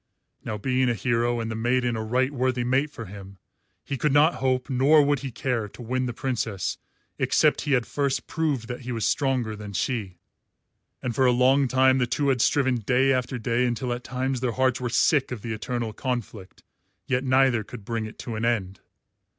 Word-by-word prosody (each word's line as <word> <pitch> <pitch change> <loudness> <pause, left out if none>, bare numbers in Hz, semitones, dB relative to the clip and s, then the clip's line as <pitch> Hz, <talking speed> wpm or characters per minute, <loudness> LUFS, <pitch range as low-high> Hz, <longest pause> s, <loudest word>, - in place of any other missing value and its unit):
Now, 110 - -4
being 130 +3 +1
a 120 - +1
hero, 120 +3 0
and 115 -1 -3
the - - -3
maiden 120 +1 +1
a 110 - -3
right 130 +4 +1
worthy 130 -2 0
mate 130 +5 +1
for 115 -5 -8
him, 100 0 -11 0.5
he 140 - -4
could 150 - +1
not 150 +4 +5
hope, 130 -1 +1
nor 140 +4 +5
would 145 -1 +1
he 135 - -5
care, 120 -3 -2
to 125 - -13
win 130 +2 -1
the - - -2
Princess 115 - -2 0.4
except - - +3
he - - +3
had 125 -3 +2
first 140 -2 -1
proved 145 -8 -1
that 125 0 -5
he 125 0 -6
was 115 -2 -1
stronger 130 -6 0
than 105 -1 -8
she; 100 -5 -2 0.9
and 125 - -2
for 130 +3 +3
a - - +5
long 130 +3 +4
time 130 +1 +4
the 125 - +1
two 140 +3 0
had 130 -3 +2
striven 130 -2 +2
day 125 +5 +2
after 130 0 -1
day 120 +2 0
until 120 +1 -2
at 120 0 -6
times 130 0 -2
their 125 -2 -1
hearts 130 0 +1
were 120 - -1
sick 130 +4 +2
of 120 -5 -6
the 115 - -3
eternal 115 +1 -3
conflict, 115 -7 -5 0.4
yet 125 0 0
neither 130 -3 +3
could 105 -1 -11
bring 115 -1 -3
it 110 - -12
to 120 - -6
an 110 - -3
end. 100 -5 -1
125 Hz, 205 wpm, -25 LUFS, 115-130 Hz, 0.9 s, not